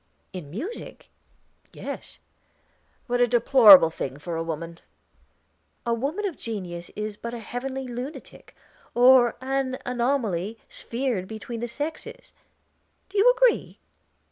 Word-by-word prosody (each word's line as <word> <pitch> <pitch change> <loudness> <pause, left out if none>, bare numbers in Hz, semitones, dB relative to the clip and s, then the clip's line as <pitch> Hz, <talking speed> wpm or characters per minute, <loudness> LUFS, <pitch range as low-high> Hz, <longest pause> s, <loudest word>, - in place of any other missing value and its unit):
"In 175 -6 -7
music 290 - -7 0.6
yes." - - -8 0.9
"What 245 0 0
a 245 - +5
deplorable 225 - +7
thing 135 -4 -5
for 165 +3 -5
a 165 - -2
woman!" 165 +1 -5 1.1
"A 235 - +1
woman 285 - -2
of 370 -6 -4
genius 180 -6 -6
is 210 0 -4
but 235 +2 -6
a - - -6
heavenly 260 +3 -5
lunatic, 250 +5 -8 0.4
or 245 0 +6
an 265 0 -1
anomaly 235 -6 -1
sphered 235 -6 -3
between 225 +2 -7
the 240 - -3
sexes; 315 - -7 0.8
do 400 +1 -1
you 485 +5 +7
agree?" - - +2
240 Hz, 120 wpm, -25 LUFS, 200-270 Hz, 1.1 s, deplorable